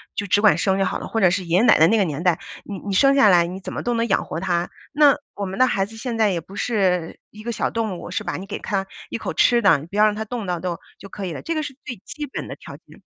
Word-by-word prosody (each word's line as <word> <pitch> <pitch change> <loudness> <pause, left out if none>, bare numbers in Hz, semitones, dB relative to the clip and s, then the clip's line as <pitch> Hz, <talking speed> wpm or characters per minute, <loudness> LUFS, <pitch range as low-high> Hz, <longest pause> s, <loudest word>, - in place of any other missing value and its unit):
就 205 - -3
只 200 - +3
管 210 0 +5
生 190 -1 +1
就 195 - +2
好 - - -1
了， - - -6
或 225 - -2
者 190 -4 +5
是 185 +1 -1
爷 170 +1 +2
爷 215 - +4
奶 245 - +6
奶 160 - +6
那 225 - +3
个 205 - +3
年 155 0 -4
代， 175 -3 +2 0.2
你 200 - -7
你 200 -1 -5
生 275 +7 +5
下 270 -6 +6
来 175 -3 +5
你 185 +2 -6
怎 195 - -7
么 - - -3
都 240 - 0
能 230 0 0
养 195 - +1
活 160 - -5
他。 175 -1 -1 0.2
那 295 -1 +5 0.2
我 200 - -4
们 190 +3 -6
的 255 - +6
孩 195 -5 0
子 225 +2 -13
现 235 0 -4
在 220 -2 +3
也 175 - -1
不 185 +5 -13
是 185 -8 0
一 215 +1 -12
个 235 - -3
小 230 - -1
动 220 -6 -3
物， - - -8
是 - - -2
吧？ - - -3
你 190 - -7
给 200 - -6
他 195 -2 -2 0.2
一 - - -3
口 - - -4
吃 240 -1 +4
的， 185 -7 +5
你 155 - -10
不 195 - -10
要 215 - +6
让 210 - +2
他 220 - -3
冻 225 0 -5
到， 180 -2 -2
都 180 -2 -3 0.2
就 200 - -11
可 195 0 -6
以 175 - -4
了， - - -7
这 330 - -3
个 310 - -1
是 285 -2 -7
最 245 - -6
基 300 - -6
本 - - -6
的 - - -7
条 - - -11
件。 - - -19
200 Hz, 350 characters per minute, -22 LUFS, 180-230 Hz, 0.2 s, 奶